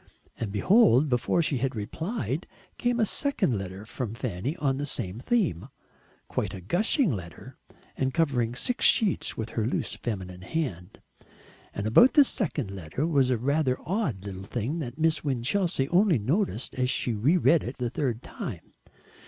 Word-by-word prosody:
And 110 -4 -3
behold! 155 - +4
before 125 +7 +1
she 140 -4 0
had 130 +1 -1
replied, 140 - -3 0.3
came 245 0 +1
a 220 - +4
second 210 - 0
letter 95 +1 -6
from 115 -1 -5
Fanny 120 - -3
on 135 -6 0
the 145 - -2
same 95 -5 -2
theme, 135 - 0 0.6
quite - - -3
a - - -7
gushing 185 - +2
letter, 85 -5 -9 0.4
and 130 0 0
covering 130 -7 0
six 250 - -1
sheets 215 -6 +3
with 110 0 -4
her 110 -1 -1
loose - - -1
feminine 95 -5 -5
hand. 105 - -4 0.7
And 100 - -4
about 180 - +6
this 285 -3 +7
second 150 - -2
letter 95 - -3
was 140 -6 +2
a 125 - +2
rather 135 +1 +1
odd 155 - -2
little 95 -2 -6
thing 120 +10 -3
that 125 -4 -5
Miss 160 0 +1
Winchelsea 140 +3 0
only 180 -2 +4
noticed 135 - -1
as 125 -1 0
she 120 - 0
re 130 - +3
read 165 -2 +4
it 125 - -6
the 120 -2 -2
third 125 -5 -2
time. - - -7
130 Hz, 165 wpm, -27 LUFS, 110-165 Hz, 0.7 s, this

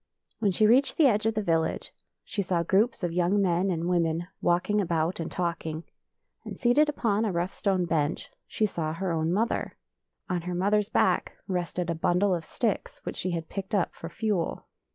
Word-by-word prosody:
When 215 -3 +2
she 195 +3 +3
reached 255 +6 +4
the 315 - +5
edge 220 -4 +3
of 225 - 0
the 215 - 0
village 165 -3 0 0.3
she 205 - -3
saw 180 -3 0
groups 205 +6 +2
of 175 - 0
young 180 +3 +2
men 185 0 +2
and 170 -1 -1
women 170 -1 +1
walking 180 +4 +2
about 170 -1 0
and 165 - -4
talking; 165 -2 -3 0.6
and - - -7
seated 275 +5 +4
upon 225 -7 0
a 215 - 0
rough 175 +1 -1
stone 190 -3 +1
bench 160 -2 -1 0.2
she 215 - 0
saw 165 -6 -2
her 185 +2 -2
own 160 0 0
mother. 220 +6 -1 0.5
On 180 -2 -1
her 180 +1 -4
mother's 205 +3 +2
back - - +2
rested 180 -2 -2
a - - +1
bundle 180 +4 +2
of 170 -2 -2
sticks 225 -5 -2
which - - -5
she 185 - -2
had 165 -2 -3
picked 195 +2 -4
up 190 - +1
for 165 - -8
fuel. 210 -4 -2
180 Hz, 195 wpm, -27 LUFS, 170-210 Hz, 0.6 s, the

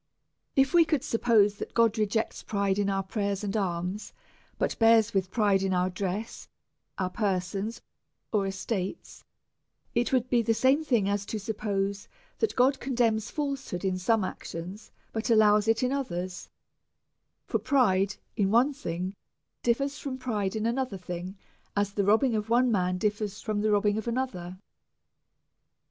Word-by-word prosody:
If 270 -1 +3
we 345 -1 +7
could 305 -4 0
suppose 215 -3 +3
that - - -7
God 230 -2 +4
rejects 220 0 -1
pride 200 -1 0
in 200 -1 +1
our 195 0 0
prayers 200 0 -2
and 200 0 -2
alms, 185 0 -2 0.4
but - - 0
Ijears 225 -1 +5
with 190 -2 0
pride 200 -3 +2
in 190 -1 0
our 180 +1 +1
dress, 195 +4 -4 0.5
our 185 -1 -1
persons, 200 +1 -2 0.5
or 200 -2 +2
estates, 195 - -4 0.7
it 240 +1 +1
would 255 -2 +2
be 245 -2 +3
the 225 0 +1
same 265 +6 +3
thing 235 -10 +2
as 200 0 0
to 220 - -3
suppose 200 -2 -2 0.3
that 445 - 0
God 260 +2 +3
condemns 230 -4 0
falshood 275 - -3
in 185 -1 0
some 210 +2 +2
ac - - -7
tions, 180 +6 -7 0.2
but 220 +3 -3
allows 210 -1 +5
it 225 +2 +2
in 250 - +1
others; 185 -10 -3 1.0
for - - -1
pride 200 -8 +2 0.2
in 200 -3 +2
one 245 +7 +4
thing 185 -8 -4 0.5
differs 275 +4 0
from 265 -2 -4
pride 215 -6 -2
in 215 0 -1
another 240 -3 -1
thing, 180 +1 -6 0.4
as 200 -1 +1
the 200 - +1
robbing 225 +5 +3
of 210 0 -2
one 245 +1 +4
man 180 -3 +1
differs 210 0 -2
from 215 -2 -2
the 215 - +1
robbing 205 0 +2
of 220 - -7
another. 210 -8 -3
210 Hz, 160 wpm, -28 LUFS, 195-235 Hz, 1.0 s, we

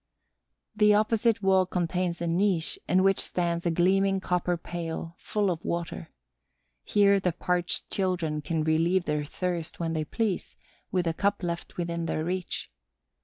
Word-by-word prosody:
The 210 -1 +5
opposite 220 0 +2
wall 190 -1 +4
contains 175 -1 -1
a - - -1
niche 175 -1 +1
in 185 +1 +4
which 195 0 +3
stands 170 -1 -1
a - - +3
gleaming 195 +3 +3
copper 180 -1 0
pail 165 -1 -5
full 205 -3 0
of 165 -2 -4
water. 165 - -3 0.7
Here 200 -1 +4
the 180 -3 0
parched 175 +1 -1
children 175 -6 -1
can 160 +1 -1
relieve 165 +4 +2
their 150 0 0
thirst 170 +2 -3
when 165 -1 -1
they 155 -1 0
please, 205 +4 -2 0.4
with 180 -2 +1
a 165 - +1
cup 200 +3 0
left 170 0 -4
within 170 -1 -2
their 155 - -1
reach. 180 +2 -3
175 Hz, 155 wpm, -28 LUFS, 165-190 Hz, 0.7 s, The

